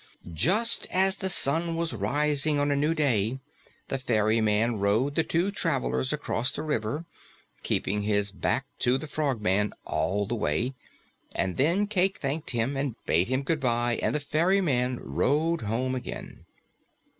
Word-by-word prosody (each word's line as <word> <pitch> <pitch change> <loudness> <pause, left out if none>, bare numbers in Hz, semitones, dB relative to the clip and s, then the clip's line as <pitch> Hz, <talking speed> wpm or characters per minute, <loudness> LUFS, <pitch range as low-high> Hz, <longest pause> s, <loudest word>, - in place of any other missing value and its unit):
Just 210 - +2
as 190 +1 +2
the 190 - 0
sun 165 +1 +2
was 165 -4 -2
rising 145 +7 +1
on 145 0 +1
a - - +2
new 150 +3 +1
day, 130 -5 +1 0.5
the 135 - -2
ferryman 110 -2 +1
rowed 110 +8 +1
the 160 - +2
two 175 +5 0
travelers 65 - 0
across 120 +3 -1
the 150 - -5
river 150 +1 -2 0.6
keeping 105 +2 -1
his 100 -1 +1
back 100 +8 -1
to 125 +1 +2
the 135 - -6
Frogman 110 -10 0
all 90 +7 0
the 115 - -3
way 115 - -1 0.6
and 95 -2 -1
then 170 +9 +2
Cayke 195 -2 +1
thanked 150 +3 -3
him 120 +3 0
and 135 -3 -2
bade 85 +4 +2
him 130 +2 0
goodbye 120 -6 0
and - - 0
the - - +2
ferryman 150 -6 +1
rowed 160 +5 +1
home 115 +4 -1
again. 130 - -7
130 Hz, 150 wpm, -27 LUFS, 110-155 Hz, 0.6 s, Just